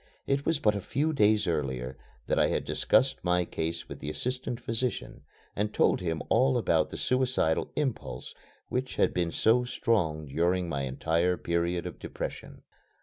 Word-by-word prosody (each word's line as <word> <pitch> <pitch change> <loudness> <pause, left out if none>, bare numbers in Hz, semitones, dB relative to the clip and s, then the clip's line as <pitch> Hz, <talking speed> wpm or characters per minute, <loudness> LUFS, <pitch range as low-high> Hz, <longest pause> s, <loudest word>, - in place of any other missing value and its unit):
It 140 +1 0
was 165 -1 +3
but 105 -8 +2
a 100 - -2
few 150 - 0
days 105 -4 +4
earlier 65 -6 -2 0.3
that - - +1
I - - +5
had - - -1
discussed 130 +1 +2
my 90 0 +2
case 80 0 -3
with - - -8
the 70 - -4
assistant 125 +6 -3
physician 120 +1 -3 0.3
and 105 +1 0
told - - +3
him 80 -3 -2
all 130 +2 +3
about 80 -9 +2
the - - -7
suicidal 130 -11 +1
impulse 75 - -3 0.3
which 130 +1 -2
had - - +2
been 85 -1 0
so 115 +7 +3
strong 85 -11 0
during 85 +5 +1
my 70 -4 -2
entire 85 +7 +1
period 85 0 -1
of - - -7
depression. - - -6
90 Hz, 165 wpm, -29 LUFS, 80-125 Hz, 0.3 s, I